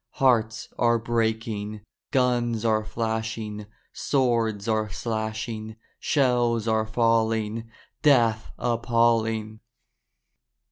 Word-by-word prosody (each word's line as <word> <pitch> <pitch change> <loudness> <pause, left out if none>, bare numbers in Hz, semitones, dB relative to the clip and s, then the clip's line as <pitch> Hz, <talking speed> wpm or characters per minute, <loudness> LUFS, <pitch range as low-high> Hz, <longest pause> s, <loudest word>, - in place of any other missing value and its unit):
Hearts 115 -4 +2
are 120 -1 +4
breaking, 110 -2 -2 0.3
Guns 120 -4 +1
are 110 -1 +2
flashing, 110 -1 -3 0.3
Swords 115 -6 0
are 110 -1 0
slashing, 110 +1 -4 0.2
Shells 120 -5 +1
are 110 -1 +1
falling, 115 -1 +1 0.3
Death 115 - +3
appalling! 115 -2 +1
115 Hz, 80 wpm, -25 LUFS, 110-120 Hz, 0.3 s, are